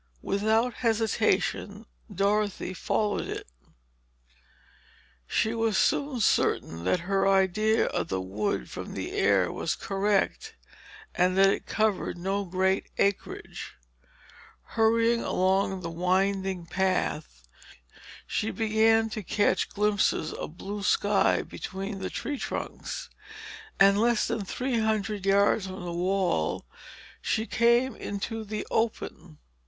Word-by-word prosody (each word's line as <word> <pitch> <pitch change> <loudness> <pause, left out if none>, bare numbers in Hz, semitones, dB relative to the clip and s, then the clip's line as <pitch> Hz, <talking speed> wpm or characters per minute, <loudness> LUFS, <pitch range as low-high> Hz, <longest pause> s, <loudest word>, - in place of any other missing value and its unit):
Without 220 +4 +1
hesitation, 225 -2 0 0.3
Dorothy 200 -1 0
followed 205 +2 -1
it. - - -5 1.8
She 220 - +1
was 225 -3 +1
soon 280 -3 +1
certain 85 - +1
that 165 - +2
her 195 +2 +1
idea 195 +3 +3
of - - -2
the 95 - -2
wood 95 - -2
from - - -7
the - - -4
air 95 -2 +2
was 165 - -2
correct, 205 - -1 0.6
and 180 +1 +2
that 195 0 +6
it - - -3
covered 215 -5 0
no 195 +3 -2
great 190 +2 0
acreage. 200 -1 -2 1.0
Hurrying 230 +1 +3
along 190 0 +1
the 170 - -4
winding 190 +1 0
footpath, 165 - -2 0.8
she 220 - -1
began 225 0 +3
to 215 - -4
catch 200 0 +1
glimpses 205 -6 +1
of 160 - -7
blue 205 +2 -5
sky 205 0 +2
between 195 +1 -6
the 190 - -3
tree 285 -2 -4
trunks, - - -5 0.7
and 200 +1 +6
less 235 -1 +2
than 230 -3 -2
three 245 +4 -1
hundred 215 -2 -1
yards 200 0 +3
from 185 -1 -7
the 170 - -4
wall 180 - 0 0.6
she 220 0 0
came 235 +2 +3
into 220 +2 -4
the 215 0 -4
open. 180 -7 -2
200 Hz, 115 wpm, -27 LUFS, 185-220 Hz, 1.8 s, that